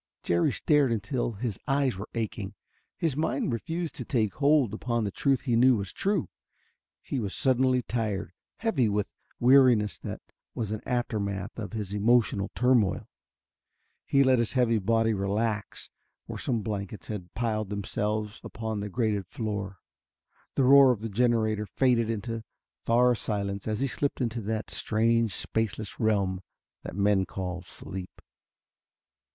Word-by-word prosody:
Jerry 85 Hz, 0 st, +2 dB
stared 145 Hz, -5 st, +2 dB
until 115 Hz, +2 st, -1 dB
his 110 Hz, -1 st, -4 dB
eyes 135 Hz, -4 st, +2 dB
were 100 Hz, +3 st, -7 dB
aching. 105 Hz, -3 st, -3 dB, 0.4 s
His 160 Hz, -5 st, 0 dB
mind 140 Hz, -4 st, 0 dB
refused 165 Hz, +8 st, -3 dB
to -, -, -4 dB
take 110 Hz, -6 st, 0 dB
hold 145 Hz, -6 st, +3 dB
upon 120 Hz, +1 st, -1 dB
the 100 Hz, -, -2 dB
truth 135 Hz, +5 st, +1 dB
he 120 Hz, -4 st, 0 dB
knew 125 Hz, +2 st, +6 dB
was 100 Hz, -3 st, -4 dB
true. 200 Hz, -4 st, 0 dB, 0.8 s
He 135 Hz, -, -3 dB
was 100 Hz, -4 st, -3 dB
suddenly 130 Hz, -1 st, +2 dB
tired, 105 Hz, -7 st, -2 dB, 0.2 s
heavy 155 Hz, -, +1 dB
with 105 Hz, 0 st, -1 dB, 0.3 s
weariness 120 Hz, -, +5 dB
that -, -, -6 dB, 0.3 s
was 110 Hz, -3 st, -3 dB
an 110 Hz, -, -3 dB
aftermath 105 Hz, -6 st, -2 dB
of 110 Hz, 0 st, -6 dB
his 105 Hz, -3 st, -4 dB
emotional 105 Hz, -1 st, +2 dB
turmoil. 125 Hz, -6 st, +2 dB, 1.0 s
He 140 Hz, 0 st, +4 dB
let 130 Hz, -2 st, +4 dB
his 115 Hz, -, 0 dB
heavy 120 Hz, -4 st, +3 dB
body 115 Hz, +2 st, +2 dB
relax 105 Hz, +2 st, -2 dB, 0.3 s
where -, -, -6 dB
some 115 Hz, -4 st, -1 dB
blankets 100 Hz, -1 st, -4 dB
had 90 Hz, -5 st, -6 dB
piled 110 Hz, -3 st, -1 dB
themselves 105 Hz, +2 st, -2 dB
upon 110 Hz, -2 st, -4 dB
the 105 Hz, +1 st, -4 dB
grated 105 Hz, -4 st, -1 dB
floor. 100 Hz, -3 st, -4 dB, 0.7 s
The 135 Hz, -, +3 dB
roar 135 Hz, 0 st, +8 dB
of 115 Hz, -4 st, -2 dB
the 115 Hz, -, -3 dB
generator 110 Hz, -1 st, +1 dB
faded 120 Hz, -3 st, +2 dB
into 115 Hz, +1 st, -3 dB, 0.4 s
far 125 Hz, +2 st, +5 dB
silence 100 Hz, -3 st, -3 dB
as 110 Hz, +1 st, -1 dB
he 135 Hz, -, +2 dB
slipped 135 Hz, +3 st, -2 dB
into 115 Hz, -2 st, -1 dB
that 110 Hz, +1 st, -3 dB
strange 115 Hz, -1 st, +1 dB
spaceless 110 Hz, -2 st, -3 dB
realm 100 Hz, -4 st, +1 dB, 0.4 s
that -, -, -7 dB
men 100 Hz, -1 st, +2 dB
call 90 Hz, -2 st, -4 dB
sleep. 95 Hz, 0 st, -9 dB
110 Hz, 145 wpm, -28 LUFS, 100-125 Hz, 1.0 s, roar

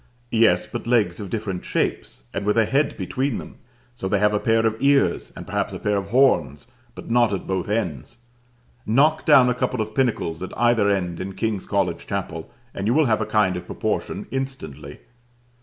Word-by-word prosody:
Yes, 110 Hz, -6 st, +4 dB
but -, -, -7 dB
legs 110 Hz, -8 st, +2 dB
of 100 Hz, -3 st, -6 dB
different 100 Hz, -4 st, -4 dB
shapes, -, -, -2 dB
and 95 Hz, -, -3 dB
with 105 Hz, +2 st, +1 dB
a 115 Hz, -, +5 dB
head 140 Hz, +6 st, 0 dB
between 130 Hz, -1 st, -2 dB
them. -, -, -9 dB, 0.4 s
So 105 Hz, -5 st, -5 dB
they 100 Hz, -, +1 dB
have 105 Hz, +1 st, +2 dB
a 105 Hz, -, +1 dB
pair 115 Hz, -1 st, +2 dB
of 110 Hz, -1 st, +1 dB
ears: 140 Hz, 0 st, +2 dB
and -, -, -8 dB
perhaps -, -, -2 dB
a -, -, -6 dB
pair 105 Hz, -1 st, 0 dB
of 100 Hz, -1 st, -2 dB
horns: 90 Hz, -, +2 dB, 0.3 s
but -, -, -8 dB
not 120 Hz, -2 st, +4 dB
at 95 Hz, -, -3 dB
both 95 Hz, 0 st, -2 dB
ends. 90 Hz, -, -3 dB, 0.7 s
Knock 150 Hz, +8 st, +2 dB
down 140 Hz, -5 st, +7 dB
a 125 Hz, -, +2 dB
couple 125 Hz, 0 st, -2 dB
of 110 Hz, 0 st, -3 dB
pinnacles 110 Hz, -10 st, -1 dB
at 95 Hz, -, -7 dB
either 120 Hz, -3 st, +3 dB
end 90 Hz, -4 st, -1 dB
in 95 Hz, +1 st, -5 dB
King's 110 Hz, -4 st, -2 dB
College 100 Hz, -3 st, -1 dB
Chapel, 80 Hz, 0 st, -4 dB, 0.2 s
and 100 Hz, +1 st, -3 dB
you 120 Hz, -, +2 dB
will 155 Hz, 0 st, +4 dB
have 110 Hz, -4 st, +1 dB
a -, -, -2 dB
kind 105 Hz, -4 st, +2 dB
of 90 Hz, -, -6 dB
proportion -, -, -3 dB
instantly. 135 Hz, -, -6 dB
110 Hz, 200 wpm, -23 LUFS, 95-120 Hz, 0.7 s, down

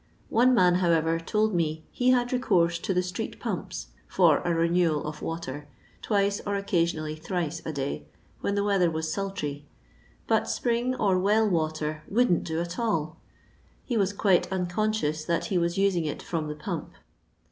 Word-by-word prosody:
One 250 Hz, +2 st, +4 dB
nan, 180 Hz, -4 st, +5 dB
how 175 Hz, -, +2 dB
ever, 165 Hz, 0 st, +2 dB
told 215 Hz, +5 st, 0 dB
me 160 Hz, -2 st, -1 dB
he 250 Hz, 0 st, +1 dB
had 245 Hz, 0 st, +3 dB
recourse 170 Hz, -9 st, +2 dB
to 190 Hz, -, -2 dB
the 180 Hz, -1 st, +2 dB
street 180 Hz, 0 st, -5 dB
purope -, -, -4 dB, 0.2 s
for -, -, +4 dB
a 175 Hz, -, -1 dB
renewal 165 Hz, -2 st, +2 dB
of 150 Hz, 0 st, -6 dB
water, 150 Hz, -3 st, -5 dB, 0.3 s
twice, 200 Hz, -1 st, +1 dB
or 200 Hz, 0 st, -1 dB
oocasiooally 165 Hz, -5 st, -1 dB
thrice 170 Hz, -3 st, -3 dB
a -, -, -1 dB
day, 140 Hz, -2 st, -4 dB, 0.3 s
when 200 Hz, -, -1 dB
the 200 Hz, -, +1 dB
weather 195 Hz, -4 st, +3 dB
was 160 Hz, 0 st, -2 dB
sultry; 150 Hz, -8 st, -4 dB, 0.6 s
but -, -, +1 dB
spring 240 Hz, +1 st, 0 dB
or 195 Hz, -6 st, +2 dB
well 210 Hz, +3 st, +3 dB
water 155 Hz, -3 st, -1 dB
" -, -, -27 dB
wouldn't 225 Hz, -5 st, +2 dB
do 160 Hz, 0 st, -2 dB
at 170 Hz, +3 st, -4 dB
all" 165 Hz, -8 st, -1 dB, 0.7 s
He 245 Hz, -, -2 dB
was 200 Hz, -3 st, +2 dB
quite 190 Hz, -3 st, +2 dB
unconscious 180 Hz, -4 st, -1 dB
that 170 Hz, +1 st, -1 dB
he 190 Hz, -5 st, +1 dB
was 170 Hz, +1 st, 0 dB
using 195 Hz, -4 st, +2 dB
it 150 Hz, -, -4 dB
from 160 Hz, -3 st, -3 dB
the 150 Hz, -, -4 dB
pump. -, -, -5 dB
175 Hz, 175 wpm, -27 LUFS, 160-200 Hz, 0.7 s, nan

